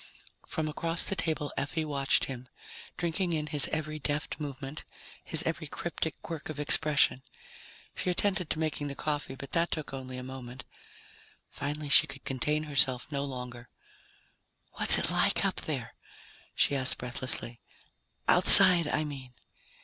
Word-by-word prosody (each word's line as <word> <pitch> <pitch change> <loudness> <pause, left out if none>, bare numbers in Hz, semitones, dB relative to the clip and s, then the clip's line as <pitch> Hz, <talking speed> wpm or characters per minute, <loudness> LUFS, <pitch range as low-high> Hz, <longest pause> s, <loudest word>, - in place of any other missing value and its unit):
From 160 -1 -3
across 165 +2 0
the 195 - -2
table 160 -4 -3
Effie 145 +3 -3
watched 140 -2 0
him, 130 -1 -9 0.5
drinking 175 +1 -2
in 155 -1 -2
his 150 -2 +2
every 155 0 -4
deft 145 +2 -4
movement, 140 0 -7 0.4
his 160 -1 -1
every 160 -1 -3
cryptic 160 +1 -5
quirk 160 -3 -7
of 150 -2 -7
expression. 150 -2 +3 0.7
She - - -3
attended 180 -2 -1
to - - -2
making 155 -2 -3
the 140 - -7
coffee, 145 -3 -4
but 140 0 -10
that 170 0 0
took 155 -3 -6
only 130 -1 -8
a 125 - -7
moment. 125 -1 -10 0.9
Finally 145 +1 -5
she 140 +2 +5
could 140 -2 -9
contain 150 +4 -2
herself 135 -2 0
no 140 -1 -3
longer. 125 -3 -8 1.0
"What's - - +6
it - - -1
like - - +2
up - - -2
there?" - - -6 0.6
she 140 - +1
asked 130 -1 -1
breathlessly. 125 -1 -3 0.7
"Outside, 175 -4 +9
I 155 - -1
mean." 135 -4 -9
145 Hz, 150 wpm, -28 LUFS, 135-155 Hz, 1.0 s, Outside